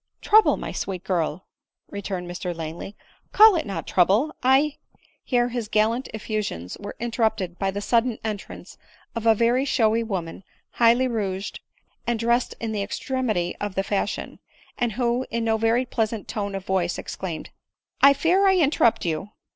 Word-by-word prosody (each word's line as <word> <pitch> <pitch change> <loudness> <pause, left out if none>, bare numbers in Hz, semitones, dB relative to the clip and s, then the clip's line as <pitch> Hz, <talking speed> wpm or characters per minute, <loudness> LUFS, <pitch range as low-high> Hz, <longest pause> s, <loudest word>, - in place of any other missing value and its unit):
" - - -52
Trouble! 435 +1 +5
my - - -5
sweet 185 -2 -4
girl 180 -2 -1 0.2
!" - - -63
returned 190 -3 -4
Mr 175 0 -4
Langley, 165 +5 -6 0.2
" - - -37
call 435 -2 +8
it 320 - -1
not 195 - -4
trouble; 205 - +2
I 270 +3 +3 0.2
— - - -33
" - - -42
Here 245 -1 +1
his 240 -3 -3
gallant 220 +4 +1
effusions 210 - -4
were 205 - -7
interrupted 220 -6 -1
by 195 - 0
the 200 +1 -3
sudden 230 +2 +1
entrance 215 -2 -6 0.3
of 230 -1 -3
a 225 - +6
very 235 +4 +2
showy 230 -4 +2
woman, 190 -6 -4 0.3
highly 240 +2 +4
rouged* 200 -5 -3 0.5
and 235 -1 +1
dressed 235 +2 +1
in 225 -1 -3
the 210 -2 -2
extremity 215 -4 -2
of 205 -2 -3
the 195 - +1
fashion; 200 +1 -3 0.4
and 240 -3 -1
who 245 +2 0
in 235 0 -2
no 225 -1 +2
very 225 +3 +2
pleasant 225 -3 -2
tone 200 -2 -3
of 195 -1 -5
voice 180 -2 0
exclaimed 175 -4 -6 0.2
— - - -64
" - - -54
1 280 +1 +8
fear 360 +7 +3
I 380 -1 +4
interrupt 285 - +3
you." 165 +4 -2
220 Hz, 180 wpm, -24 LUFS, 195-245 Hz, 0.5 s, call